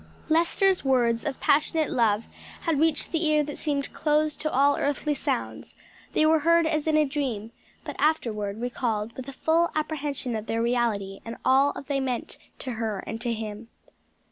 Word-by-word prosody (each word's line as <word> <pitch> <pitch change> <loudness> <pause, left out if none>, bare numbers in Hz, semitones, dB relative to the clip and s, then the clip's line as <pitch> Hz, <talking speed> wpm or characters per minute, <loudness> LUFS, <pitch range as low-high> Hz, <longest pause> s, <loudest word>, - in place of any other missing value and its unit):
Lester's 345 +4 +3
words 240 -4 +2
of 290 -3 -3
passionate 310 +1 +2
love 225 -2 +2 0.4
had 325 -4 0
reached 315 -1 +2
the 330 0 0
ear 305 -1 +3
that 295 0 -6
seemed 285 -2 -1
closed 305 0 +1
to 310 - -1
all 280 +2 +4
earthly 290 +1 0
sounds; 280 - -3 0.4
they 310 - +3
were 315 0 +5
heard 335 +2 +4
as 310 -1 0
in 310 -1 +3
a 305 - +4
dream, 260 -7 -3 0.3
but - - -6
afterward 215 -9 0
recalled 230 -3 -2
with 260 0 -7
a - - -5
full 325 +5 +2
apprehension 295 -5 -2
of 220 0 -5
their 225 - -1
reality 230 -5 0
and 230 0 -6
of - - -20
all 270 +2 +3
they 280 -1 -1
meant 255 -3 -2 0.2
to 260 - -5
her 215 -4 -2
and 225 +1 -5
to 240 -1 -1
him. 220 0 -5
275 Hz, 180 wpm, -26 LUFS, 230-310 Hz, 0.4 s, were